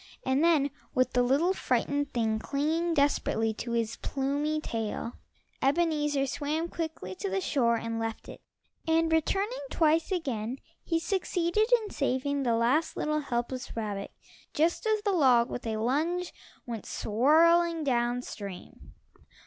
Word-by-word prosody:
And 265 +3 +2
then 305 -5 +3 0.2
with 255 -1 +2
the 245 - +3
little, 280 +9 +3
frightened 285 -1 0
thing 220 -2 0
clinging 320 +7 0
desperately 225 -6 +1
to 235 +2 -5
his 230 -1 -1
plumy 285 +3 -1
tail, 230 -3 -4 0.5
Ebenezer 295 -1 +2
swam 300 +5 -2
quickly 320 - -5
to 195 +1 -4
the 195 0 0
shore 235 +2 +2
and 230 0 -3
left 225 -1 -4
it - - -10 0.5
and 325 0 +2
returning 395 +9 +1
twice 320 0 +2
again, 260 - -2 0.3
he 330 - 0
succeeded 360 +3 0
in 420 - -7
saving 280 +1 -1
the 240 -3 +2
last 260 +8 +1
little 305 0 0
helpless 250 -2 -3
rabbit 205 -3 -3 0.5
just 335 +8 +1
as 430 -1 +1
the 410 - +1
log 255 -8 +4
with 245 - -5
a 220 -1 -1
lunge 315 +10 0 0.3
went 230 -3 -6
swirling 325 +8 +3
down 245 -2 0
stream. 200 -6 -9
280 Hz, 140 wpm, -29 LUFS, 235-325 Hz, 0.5 s, log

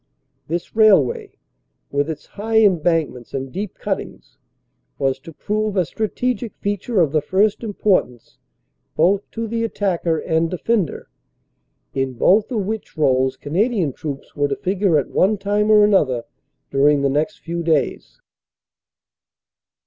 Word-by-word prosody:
This 170 +5 -4
railway, 200 - +4 0.6
with 145 +2 0
its 150 -2 -6
high 220 +2 -2
embankments 165 - +1
and 135 -1 -4
deep 200 +2 -5
cut - - -2
tings, - - -13 0.6
was 135 -1 0
to 155 +5 -11
prove 210 +5 -2
a 180 - +3
strategic 230 +3 -2
feature 205 +2 -2
of 155 -5 +2
the 155 0 +2
first 195 +7 +1
importance 195 - -1 0.6
both 190 +5 +2
to 230 0 -4
the 230 +1 -2
attacker 180 -7 0
and 160 +1 0
defender, 190 +1 -1 0.9
in 135 -1 -1
both 200 - +3
of 215 -5 -1
which 215 -4 -5
roles 130 -3 +2
Cana 170 - 0
dian 180 - -1
troops 140 -1 -7
were 145 -1 +1
to 140 - -2
figure 190 -3 +1
at 140 - -1
one 205 +3 +2
time 205 +2 0
or 210 -1 +7
another 150 - +2 0.5
during 140 +1 +3
the - - +3
next 150 +9 -1
few 170 +1 -4
days. 160 -4 -1
175 Hz, 140 wpm, -20 LUFS, 145-210 Hz, 0.9 s, or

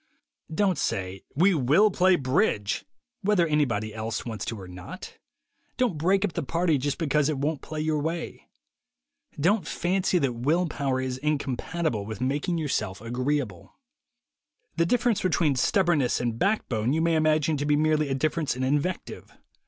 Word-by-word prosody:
Don't 185 0 +1
say, 95 0 -2
"We 185 +7 +4
will 160 - +4
play 185 0 +4
bridge," 130 - 0 0.4
whether 200 -4 +3
anybody 120 -9 0
else 110 0 -4
wants 110 -3 -5
to 115 - -4
or 95 - -9
not. 90 0 -10 0.6
Don't 250 -8 +1
"break 190 +5 +3
up 185 - -4
the 170 - -2
party" 165 +1 +1
just 145 +2 -1
because 150 -2 +1
it 150 - -1
won't 145 +2 -1
play 155 0 -5
your 155 -1 0
way. 165 +3 -4 0.9
Don't 190 +7 +2
fancy 185 +1 0
that 135 -7 +1
will 150 +10 +1
power 140 -5 -1
is 130 -1 -3
in 150 +2 +1
compatible 140 - -2
with 110 0 -6
making 145 +7 -1
yourself 110 -11 -2
agreeable. 125 - -3 1.0
The 170 0 +2
difference 240 -1 +2
between 165 -5 +2
stubbornness 155 -2 +2
and 120 -2 -2
back 210 +3 +1
bone 115 +2 0
you 160 - +1
may 165 0 +2
imagine 155 -1 +2
to 145 - -2
be 150 - +4
merely 155 -1 +2
a 135 - 0
difference 155 +1 0
in 130 - -3
invective. 145 +7 -2
150 Hz, 165 wpm, -26 LUFS, 125-170 Hz, 1.0 s, We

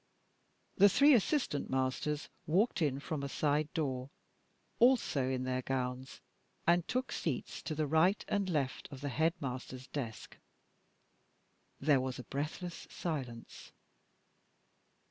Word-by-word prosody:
The 200 +1 +8
three 285 +9 +6
assistant 245 - +1
masters 130 +3 -1 0.2
walked 190 +6 +2
in 140 -3 +1
from 150 0 -4
a 140 - -3
side 150 +1 +1
door, 135 -5 -1 0.7
also 230 - +4
in 130 -1 -1
their 130 0 -1
gowns, 130 0 -3 0.4
and 170 0 +3
took 255 +1 -1
seats - - -3
to 155 - -4
the 155 0 0
right 160 +7 +3
and 200 -2 0
left 140 -6 -1
of 135 -1 -8
the 145 - -2
headmaster's 130 -4 -2
desk. 125 -6 -6 1.4
There 140 -2 +4
was 130 -1 -3
a 125 - -7
breathless 155 +6 -5
silence. 130 -9 -5
145 Hz, 125 wpm, -33 LUFS, 130-170 Hz, 1.4 s, The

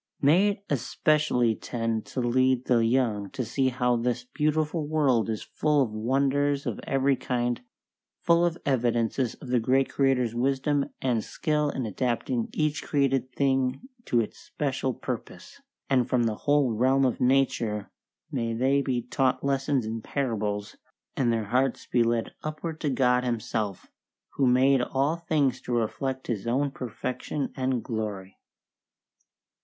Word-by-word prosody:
May 170 +9 +5
it 200 0 -4
especially 145 -3 +1
tend 115 -2 -3
to 130 - -3
lead 130 +1 +2
the 120 -2 +3
young 115 -4 +1
to 130 - -2
see 130 +3 +1
how 125 -1 +1
this 120 +1 -1
beautiful 155 +3 -1
world 140 -8 +2
is 110 -2 -3
full 150 -2 +1
of 115 - -4
wonders 140 +5 +1
of - - -3
every 135 0 +2
kind, 120 -1 -1 0.6
full 170 0 +3
of 170 -1 +1
evidences 120 -2 +1
of 130 - -11
the 125 -1 +3
Great 130 +4 +2
Creator's 130 -4 +2
wisdom 135 +3 0
and 120 -4 +1
skill 150 -2 0
in 130 -3 -3
adapting 120 +2 -1
each 155 -1 0
created 135 -3 0
thing 135 - 0 0.2
to 120 - +2
its 110 - -3
special 135 -3 -2
purpose, 130 - -7 0.3
and 130 -2 +2
from 125 -2 +2
the 115 -2 +1 0.2
whole 145 -4 +4
realm 130 +4 +3
of 125 - -1
nature 120 -5 +1 0.4
may 115 -1 -1
they 135 +4 +2
be 125 -3 -1
taught 130 +2 0
lessons 135 -2 0
in 110 +1 -4
parables, 105 -6 -2 0.4
and 120 -3 +2
their 115 -2 0
hearts 130 +4 0
be 120 - +1
led 115 -1 0
upward 155 +1 -5
to 150 - 0
God 125 -1 +2
Himself, 110 -4 -2 0.4
who 135 - +1
made 130 +1 +4
all 135 +5 0
things 150 -7 0
to 125 - -4
reflect 130 +3 -2
His 115 -2 -3
own 135 +4 +1
perfection 130 +3 -4
and 130 -2 -1
glory. 105 -5 -5
130 Hz, 150 wpm, -27 LUFS, 120-140 Hz, 0.6 s, May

